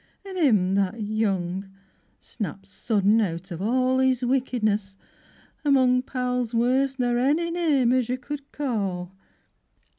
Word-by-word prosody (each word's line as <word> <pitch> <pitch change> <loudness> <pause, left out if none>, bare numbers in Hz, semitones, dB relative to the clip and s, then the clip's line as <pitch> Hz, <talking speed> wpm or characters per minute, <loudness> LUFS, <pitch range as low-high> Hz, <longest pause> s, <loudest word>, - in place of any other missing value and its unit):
Yi, 390 - -8
an' 375 - -6
'im 210 - +3
that 200 +3 0
young, 195 -3 -2 0.5
Snapped 200 -3 -6
sudden 210 +1 +1
out 180 -1 -3
of 170 +1 -5
all 255 +4 +2
His 260 -1 +2
wickedness, 215 -6 0 0.7
among 260 -3 +4
Pals 250 -2 -2
worse 260 +3 +2
n'r 245 -1 +1
ony 305 +7 +1
name 300 -8 +2
as 255 -2 +1
you 250 - 0
could 280 +2 -8
call. 200 -10 -3
245 Hz, 130 wpm, -25 LUFS, 200-260 Hz, 0.7 s, among